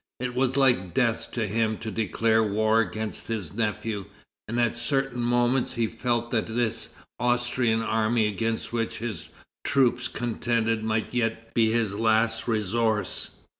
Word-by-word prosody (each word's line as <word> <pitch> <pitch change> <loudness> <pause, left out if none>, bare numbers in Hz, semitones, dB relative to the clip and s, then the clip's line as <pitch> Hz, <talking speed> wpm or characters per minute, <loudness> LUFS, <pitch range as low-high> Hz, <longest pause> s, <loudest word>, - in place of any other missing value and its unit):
It 125 0 -2
was 130 +1 +2
like 125 -9 +3
death 120 -4 +1
to 115 -3 0
him 110 +1 0
to 110 0 -5
declare 110 +1 +2
war 110 +1 +2
against 110 -1 -3
his 105 -8 -3
nephew, 105 -2 -2 0.4
and 115 +3 -2
at 120 -1 +2
certain 135 0 -1
moments 120 +1 +2
he 115 -1 +1
felt 120 +1 -1
that 115 -3 0
this 115 0 0 0.3
Austrian 120 -1 +1
army 110 0 +2
against 115 +3 -2
which 115 -1 -1
his 115 -2 -5 0.3
troops 125 -3 +2
contended 115 -2 -1
might 110 +1 -1
yet 115 -1 -2
be 110 -1 +3
his 110 -3 +1
last 110 +1 +2
resource. 110 -2 0
115 Hz, 145 wpm, -26 LUFS, 110-120 Hz, 0.4 s, like